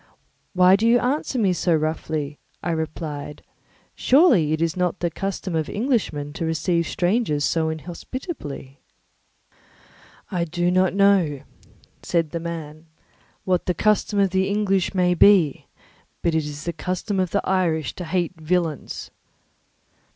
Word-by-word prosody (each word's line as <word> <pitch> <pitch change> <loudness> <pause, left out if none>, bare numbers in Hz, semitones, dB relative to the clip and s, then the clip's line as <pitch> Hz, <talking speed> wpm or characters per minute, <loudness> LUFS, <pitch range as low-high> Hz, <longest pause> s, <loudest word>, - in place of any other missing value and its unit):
"Why 185 0 +6
do 220 +3 +1
you 235 +1 +6
answer 260 +2 -1
me 200 -6 +2
so 175 -1 +1
roughly?" 155 -2 -2 0.2
I 175 - -1
replied. 155 -2 -5 0.5
"Surely 250 - +4
it 155 - 0
is 165 -1 0
not 180 0 -1
the 170 -1 -1
custom 195 0 -4
of 160 -2 -1
Englishmen 205 - -1
to 165 - -4
receive 165 +1 0
strangers 180 -6 0
so 160 -1 +1
inhospitably." 160 - -7 1.5
"I 175 -2 0
do 175 +2 0
not 185 0 +2
know," 195 -8 +3 0.6
said 165 -3 0
the 170 - -3
man, 160 -1 -7 0.6
"what 180 -2 0
the 180 - +1
custom 210 +2 +1
of 195 -2 +3
the 190 +1 +1
English 200 -2 0
may 180 -1 +3
be, 175 -5 +4 0.6
but 170 - +1
it 160 -1 +1
is 150 0 -7
the 170 - -3
custom 185 +5 -3
of 185 -1 +1
the 200 - -1
Irish 165 -6 0
to 180 - -7
hate 175 -1 -2
villains." 165 -2 -2
175 Hz, 145 wpm, -23 LUFS, 160-195 Hz, 1.5 s, Why